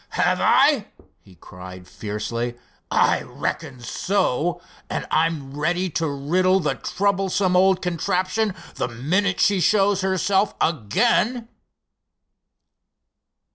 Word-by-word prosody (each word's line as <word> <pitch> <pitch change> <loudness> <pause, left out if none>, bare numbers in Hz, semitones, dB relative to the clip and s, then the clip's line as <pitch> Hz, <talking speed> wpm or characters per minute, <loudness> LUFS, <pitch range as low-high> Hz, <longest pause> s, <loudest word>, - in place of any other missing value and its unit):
"Have - - +2
I?" - - +4 0.3
he 95 - -20
cried, 90 +1 -12
fiercely. 115 +4 -4 0.3
"I - - +2
reckon 125 -2 -5
so, 175 +3 -1 0.3
and - - -3
I'm 155 -4 0
ready 175 +4 -1
to 160 0 -1
riddle 180 +7 +1
the 150 -5 0
troublesome 195 -1 0
old 190 0 +3
contraption 185 +4 -1 0.2
the - - -1
minute 175 - -1
she 200 -2 +3
shows 200 0 +3
herself 190 +1 +1
again!" 225 - +1
180 Hz, 100 wpm, -22 LUFS, 140-195 Hz, 0.3 s, I